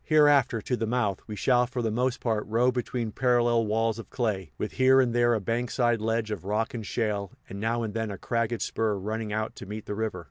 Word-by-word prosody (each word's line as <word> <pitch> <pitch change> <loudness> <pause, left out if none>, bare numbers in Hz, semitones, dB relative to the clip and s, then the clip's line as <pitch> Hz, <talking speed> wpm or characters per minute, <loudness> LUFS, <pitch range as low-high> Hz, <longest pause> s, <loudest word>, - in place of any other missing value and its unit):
Hereafter, 145 -7 +4
to 125 - 0
the 115 -2 -2
mouth, 110 -5 0
we 105 - -5
shall 125 +2 +3
for 125 -1 -3
the 110 - 0
most 125 +3 0
part 110 -3 0
row 120 +4 +3
between 125 -2 -3
parallel 120 -2 +2
walls 115 +1 0
of 115 - -9
clay, 100 -9 -2
with 105 - -3
here 130 +1 +5
and 125 -3 +2
there 120 0 +3
a - - 0
bankside 120 +1 0
ledge 110 0 -1
of 100 -5 -4
rock 105 +3 -1
and 115 -2 -4
shale, 105 -3 -2 0.2
and 100 - -7
now 115 +2 0
and 110 -2 -4
then 115 -1 -2
a 100 - -5
cragged 115 +2 -1
spur 110 -2 0
running 105 +2 -3
out 110 +1 -2
to 100 - -8
meet 105 +1 -6
the - - -4
river. 110 -3 -2
115 Hz, 235 wpm, -27 LUFS, 105-120 Hz, 0.2 s, here